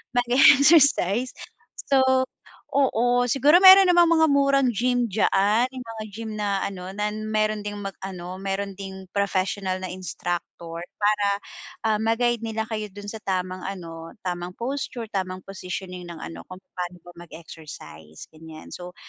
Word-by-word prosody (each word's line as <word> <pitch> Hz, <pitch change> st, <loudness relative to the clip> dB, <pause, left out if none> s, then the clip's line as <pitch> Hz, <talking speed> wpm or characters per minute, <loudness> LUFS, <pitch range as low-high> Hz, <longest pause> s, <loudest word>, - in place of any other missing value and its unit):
mag-e-exercise. 260 Hz, -, +5 dB, 0.6 s
So, 275 Hz, -, +4 dB, 0.7 s
oo 245 Hz, -2 st, +2 dB
siguro 285 Hz, +8 st, +5 dB
mayro'n 380 Hz, 0 st, +10 dB
namang 345 Hz, -1 st, +6 dB
mga 320 Hz, 0 st, +4 dB
murang 275 Hz, -1 st, +3 dB
gym 245 Hz, +1 st, 0 dB
dyaan, 210 Hz, +3 st, +2 dB
yung 255 Hz, -, -6 dB
mga 225 Hz, -1 st, -7 dB
gym 220 Hz, +2 st, -7 dB
na 200 Hz, -2 st, -1 dB
ano 185 Hz, -2 st, -5 dB
na 210 Hz, 0 st, -1 dB
mayro'n 215 Hz, 0 st, -1 dB
ding 205 Hz, -, -5 dB
mag-ano, 190 Hz, -2 st, -7 dB
mayro'n 195 Hz, +1 st, -3 dB
ding 190 Hz, -1 st, -8 dB
professional 195 Hz, -1 st, -1 dB
na 185 Hz, -, -4 dB
instructor 175 Hz, -2 st, -5 dB, 0.2 s
para, 205 Hz, -1 st, +1 dB, 0.6 s
ah, 215 Hz, -, +2 dB
ma-guide 230 Hz, +1 st, +1 dB
nila 220 Hz, 0 st, -3 dB
kayo 215 Hz, -2 st, -3 dB
do'n 205 Hz, 0 st, -8 dB
sa 220 Hz, -, -7 dB
tamang 185 Hz, 0 st, -2 dB
ano, 165 Hz, -4 st, -7 dB
tamang 180 Hz, 0 st, -4 dB
posture, 240 Hz, -2 st, -4 dB
tamang 185 Hz, -1 st, -3 dB
positioning 185 Hz, -1 st, -7 dB
ng 170 Hz, -2 st, -9 dB
ano, -, -, -8 dB
kung 185 Hz, 0 st, -10 dB
papaano 180 Hz, 0 st, -7 dB
ba 175 Hz, -, -12 dB, 0.2 s
mag-exercise, 145 Hz, -, -12 dB
ganiyan. 155 Hz, 0 st, -12 dB
So, 180 Hz, 0 st, -9 dB
205 Hz, 140 wpm, -24 LUFS, 185-240 Hz, 0.7 s, mayro'n